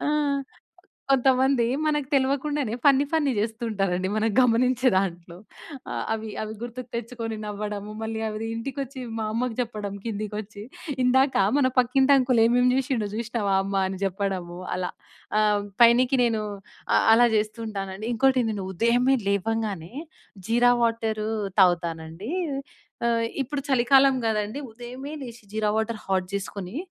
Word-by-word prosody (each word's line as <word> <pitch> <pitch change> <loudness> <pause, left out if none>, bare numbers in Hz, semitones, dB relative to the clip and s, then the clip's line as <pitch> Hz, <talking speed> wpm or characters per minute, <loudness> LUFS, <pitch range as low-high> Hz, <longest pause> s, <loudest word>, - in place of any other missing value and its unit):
ఆ! - - +1 1.0
కొంతమంది 265 -1 +3 0.2
మనకు 295 -3 0
తెలవకుండానే, 275 -2 0
ఫన్నీ 280 0 +5
ఫన్నీ 295 -4 +2
చేస్తూ 225 +3 -2
ఉంటారండి 190 -2 0
మనం 220 +1 +2
గమనించే 250 +1 +3
దాంట్లో. 175 -2 -2 0.8
అవి, 220 0 -3
అవి 215 0 -5
గుర్తుకు 245 +1 -7
తెచ్చుకొని 230 -1 -4
నవ్వడము, 210 0 -5
మళ్ళీ 220 0 -3
అవి 215 +1 -4
ఇంటికొచ్చి 270 +2 -5 0.2
మా 220 - -2
అమ్మకి 235 0 -2
జెప్పడం. 210 -4 -4
కిందికి 210 -2 -4
వచ్చి 205 0 -10 0.4
ఇందాక 265 +2 +3 0.2
మన 265 - +4
పక్కింటి 265 +3 +4
అంకుల్ 250 -3 +3
ఏమేం 245 +1 +3
జేసిండో 255 -5 0
చూసినవా 225 -4 -1
అమ్మా? 195 0 0
అని 190 -1 -5
చెప్పడము. 185 -2 -3 0.2
అలా 180 0 -2 0.5
ఆహ్, 210 -1 +2 0.2
పైనికి 250 +3 +5
నేను 225 -2 0 0.5
అ - - +6 0.2
అలా 240 +1 +5
చేస్తూ 215 +1 -1
ఉంటానండి. 195 +1 -5
ఇంకోటి 260 +2 +3 0.3
ఉదయమే 245 +6 +3
లేవంగానే 200 -3 -1 0.6
జీరా 240 +1 +4
వాటరు 225 -2 0 0.3
తాగుతానండి. 170 - 0 0.7
ఆహ్, 230 -1 +2 0.2
ఇప్పుడు 280 +2 -4
చలికాలం 270 +1 +5
గదండీ. 215 +3 -1
ఉదయమే 250 +5 -8
లేచి 235 -3 -9
జీరా 215 -1 0
వాటరు 220 0 -1
హాట్ 185 -1 0
జేసుకొని, 200 +1 -5
225 Hz, 130 wpm, -25 LUFS, 205-255 Hz, 1.0 s, అ